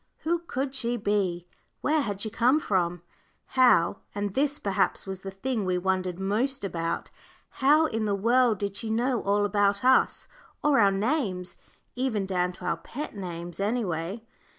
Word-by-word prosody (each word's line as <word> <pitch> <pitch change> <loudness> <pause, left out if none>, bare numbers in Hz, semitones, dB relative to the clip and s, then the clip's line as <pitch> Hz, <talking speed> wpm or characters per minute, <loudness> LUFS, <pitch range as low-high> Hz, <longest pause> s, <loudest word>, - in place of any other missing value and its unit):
Who 340 +2 0
could 275 -5 -3
she 240 -2 -1
be? 195 -5 -1 0.3
where 305 +1 +2
had 205 -6 -3
she 220 - -3
come 250 +7 +3
from? 175 - -1 0.5
how 245 -9 +4 0.2
and 205 -1 -2
this, 285 +3 +1
perhaps, 195 -2 0
was 190 -1 -5
the 195 - -7
thing 215 +4 -2
we 185 -1 0
wondered 185 -1 -1
most 230 +8 0
about 165 -4 -3 0.5
how 300 +4 +5
in 225 -6 -1
the 205 -1 +1
world 235 +2 +3
did 200 0 -3
she 225 - -4
know 240 +2 +1
all 205 +1 +2
about 205 +2 +1
us, 260 0 +3 0.4
or 295 -4 +4
our 200 -2 +6
names, 195 - -1 0.4
even 245 -6 -1
down 180 -1 0
to - - -11
our - - 0
pet 285 -1 -7
names, 175 -3 -6
any 220 +4 0
way? 175 +6 -4
205 Hz, 170 wpm, -27 LUFS, 190-255 Hz, 0.5 s, our